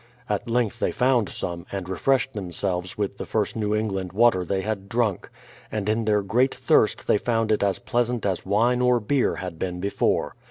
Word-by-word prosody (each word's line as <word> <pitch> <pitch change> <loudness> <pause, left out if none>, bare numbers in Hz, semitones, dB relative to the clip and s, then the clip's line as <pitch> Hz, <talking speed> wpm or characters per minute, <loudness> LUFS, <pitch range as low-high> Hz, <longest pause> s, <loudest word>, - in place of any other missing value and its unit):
At 105 +3 -2
length 115 -2 0
they - - +1
found 125 -4 +2
some, 85 0 -5
and 95 -2 -4
refreshed 135 +7 +1
them 95 -5 -5
selves 90 +4 -3
with 100 -1 -3
the - - -4
first 105 -3 -1
New 105 -1 0
England 95 -4 -2
v/ater 110 -3 +4
they 95 +2 -1
had 100 -1 -4
drunk; 110 -5 0 0.4
and 105 -2 -2
in 110 +1 +1
their 105 -1 +2
great 125 +7 +2
thirst - - +2
they 105 - +3
found 115 -1 0
it 105 - +2
as 100 -1 +1
pleasant 120 -1 -1
as 95 -3 0
w'ine 115 +6 +1
or 125 -1 +4
beer 125 +4 +1
had 90 -3 -6
been 90 -1 -3
before. 100 +2 0
105 Hz, 200 wpm, -24 LUFS, 95-120 Hz, 0.4 s, v/ater